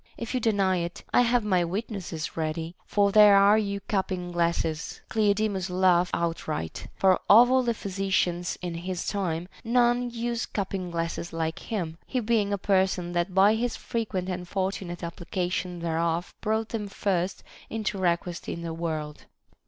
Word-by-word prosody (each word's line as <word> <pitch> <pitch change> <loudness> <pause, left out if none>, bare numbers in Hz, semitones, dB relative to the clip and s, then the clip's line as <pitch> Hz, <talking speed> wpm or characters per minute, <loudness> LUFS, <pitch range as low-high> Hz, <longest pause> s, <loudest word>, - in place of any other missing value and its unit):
If 230 +1 -5
you 255 - +1
deny 200 -5 +2
it, 170 0 -4
I - - +6
have 245 -1 +2
my 185 -4 +2
witnesses 180 -3 -4
ready; 160 +1 -3
for 200 -1 +3
there 210 -1 +8
are 200 +2 +6
your 200 -1 -2
cupping 185 -3 -2
glasses. 170 -1 -1
Cleodemus 205 -3 +1
laughed 180 -1 +3
outright; 165 - -3
for 190 -1 +4
of 240 +4 +8
all 260 0 +5
the 235 -2 0
physicians 185 -3 -1
in 175 -1 -3
his 180 +1 -4
time, 180 -4 -2 0.2
none 240 +1 +2
used 235 0 -3
cupping 190 -2 -2
glasses 170 0 -3
like 160 0 -2
him, 170 -7 -4
he 255 - -1
being 215 -3 +1
a 200 - +1
person 190 -2 +1
that 175 +1 -1
by 195 +2 +6
his 230 +1 -1
frequent 215 -6 -3
and 180 -1 -4
fortunate 185 -2 -3
application 175 +1 -3
thereof 165 +1 -1
brought 220 +1 0
them 215 -3 -3
first 190 -2 -1 0.3
into 215 -2 -2
request 175 -1 -1
in 170 - -4
the 165 -1 -4
world. 155 -3 -4
185 Hz, 160 wpm, -27 LUFS, 170-210 Hz, 0.3 s, there